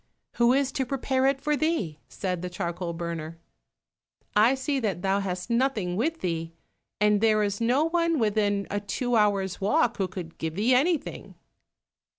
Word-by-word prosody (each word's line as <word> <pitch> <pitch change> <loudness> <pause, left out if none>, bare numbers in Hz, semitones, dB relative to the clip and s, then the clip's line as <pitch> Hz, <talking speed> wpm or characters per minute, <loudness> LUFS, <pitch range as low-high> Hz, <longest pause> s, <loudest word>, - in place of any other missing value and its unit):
"Who 235 0 +5
is 275 0 +1
to 270 -1 -1
prepare 265 0 +1
it 275 0 +1
for 300 +1 +1
thee?" 290 - -1
said 180 -3 -3
the 180 - -4
charcoal 175 -1 -3
burner. 165 -1 -5 1.0
"I 225 +6 +5
see 270 +1 -1
that 200 -7 -2
thou 195 +1 +2
hast 185 +2 -4
nothing 235 -8 +1
with 315 - -1
thee, 165 -2 -3 0.5
and 210 0 +3
there 215 -1 +4
is 205 +1 -2
no 250 +6 +3
one 335 0 +1
within 205 -3 +1
a 205 - 0
two 240 +5 -2
hours' 200 -4 +1
walk 240 +4 +2
who 190 - 0
could 180 -3 -8
give 160 -1 -3
thee 220 +6 +2
anything." 300 +5 0
210 Hz, 165 wpm, -26 LUFS, 180-265 Hz, 1.0 s, Who